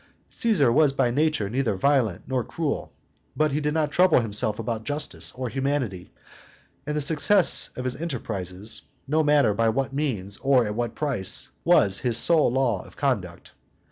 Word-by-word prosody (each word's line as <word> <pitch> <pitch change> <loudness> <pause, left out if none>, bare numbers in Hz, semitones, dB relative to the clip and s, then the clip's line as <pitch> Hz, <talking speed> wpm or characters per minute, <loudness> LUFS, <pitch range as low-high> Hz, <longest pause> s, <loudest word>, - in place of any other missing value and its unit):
Caesar 185 - +2
was 145 +2 +3
by 125 -3 +1
nature 150 -5 0
neither 120 -1 -1
violent 120 -5 +1
nor 130 -1 -1
cruel; 155 +2 -4 0.5
but 155 -1 +2
he 150 +2 -1
did 150 +1 -1
not 155 -2 0
trouble 180 -2 +4
himself 110 -1 -1
about 115 -1 -4
justice 145 +4 -4
or 130 0 -5
humanity, 130 -8 -3 0.8
and 150 0 -2
the - - 0
success 165 +6 +4
of 125 - -4
his 130 +4 -4
enterprises, 105 - -3 0.3
no 155 +3 +2
matter 145 -7 +3
by 115 +2 +1
what 135 +4 -2
means 110 -9 -2
or 130 -2 +2
at 105 - -3
what 120 0 -3
price, 120 -8 0
was 150 - +3
his 120 -3 0
sole 160 -7 +3
law 125 -7 0
of - - -17
conduct. 100 -12 -3
130 Hz, 170 wpm, -24 LUFS, 110-150 Hz, 0.8 s, trouble